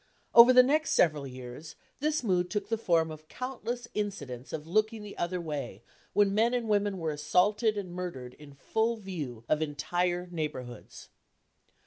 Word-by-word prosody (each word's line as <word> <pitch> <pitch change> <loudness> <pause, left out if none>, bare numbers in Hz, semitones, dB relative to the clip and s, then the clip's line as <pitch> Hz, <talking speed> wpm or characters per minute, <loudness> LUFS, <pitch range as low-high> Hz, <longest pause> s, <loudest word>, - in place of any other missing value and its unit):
Over 235 +2 +10
the 250 0 +8
next 305 +5 +1
several 150 -5 +3
years, 130 +4 -9 0.2
this 305 0 0
mood 180 -4 +1
took 205 +1 -3
the 225 - +1
form 165 -6 +2
of 155 0 -11
countless 245 0 -5
incidents 140 - -4
of 155 -1 -5
looking 215 +5 0
the 205 - -9
other 180 +1 -2
way 140 - -5 0.3
when 205 -1 +3
men 230 +4 +3
and 240 -2 -2
women 205 -2 +1
were 165 -3 -2
assaulted 205 +9 +2
and 185 -4 -5
murdered 170 -9 -6
in 145 -2 -13
full 225 +10 0
view 155 - -6
of 155 0 +1
entire 175 +4 -1
neighborhoods. 130 -8 -6
180 Hz, 160 wpm, -29 LUFS, 150-215 Hz, 0.3 s, Over